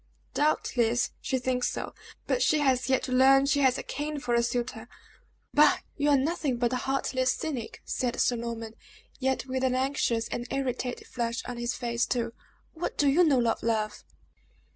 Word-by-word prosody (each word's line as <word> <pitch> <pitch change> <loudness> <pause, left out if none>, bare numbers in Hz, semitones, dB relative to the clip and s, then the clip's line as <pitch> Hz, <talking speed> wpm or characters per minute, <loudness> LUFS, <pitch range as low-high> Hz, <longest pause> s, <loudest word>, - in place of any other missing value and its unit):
"Doubtless 245 -5 +1
she 265 - -1
thinks 250 0 0
so; - - -5 0.3
but - - 0
she 310 - +4
has 265 -3 +1
yet 265 - +2
to 255 - -4
learn 270 +2 +6
she 275 +1 +2
has 265 -2 +3
a - - -5
king 295 0 -4
for 245 -3 -2
a 235 - +4
suitor!" 240 -1 -3 0.6
"Bah! - - +6 0.2
You 295 0 +1
are 285 - +5
nothing 280 -2 0
but 240 +1 0
a - - +1
heartless 260 0 0
cynic," 260 -8 -5
said 245 -1 -2
Sir 245 - +3
Norman, 230 -1 -5 0.5
yet 265 -1 0
with 260 0 -2
an 255 -1 +2
anxious 255 -3 0
and 240 - -4
irritated 255 -2 -3
flush 235 -1 -3
on 245 - -5
his 240 +1 -2
face, 235 -1 -1
too: 235 -2 -1 0.4
"What 335 +2 -4
do 290 - +3
you 300 +6 +5
know 265 -7 +3
of 225 - 0
love?" 220 -2 -1
255 Hz, 185 wpm, -28 LUFS, 235-275 Hz, 0.6 s, learn